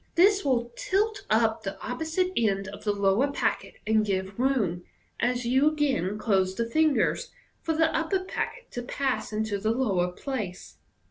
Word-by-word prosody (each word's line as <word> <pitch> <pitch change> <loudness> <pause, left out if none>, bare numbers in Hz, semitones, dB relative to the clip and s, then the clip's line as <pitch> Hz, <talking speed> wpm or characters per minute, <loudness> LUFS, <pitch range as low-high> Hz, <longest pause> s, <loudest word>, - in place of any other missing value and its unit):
This 395 +3 +5
will 240 -3 0
tilt 410 +1 -1
up 220 0 +2
the 195 - -5
opposite 320 +8 -1
end 195 -4 +1
of 205 +1 -10
the 210 - +3
lower 205 +7 +2
packet, - - -1
and 215 0 +3
give 195 0 -2
room, 220 -10 +1 0.4
as 245 0 0
you 265 +5 +4
again 270 - 0
close 190 -4 +1
the 230 - 0
fingers, 310 +3 +2 0.3
for 320 - -1
the 320 0 +2
upper 325 +4 +1
packet 485 +6 -5
to 245 - -4
pass 265 +1 -2
into 215 -1 -1
the 215 +2 0
lower 200 -7 +1
place. 210 -4 -6
240 Hz, 160 wpm, -27 LUFS, 205-305 Hz, 0.4 s, This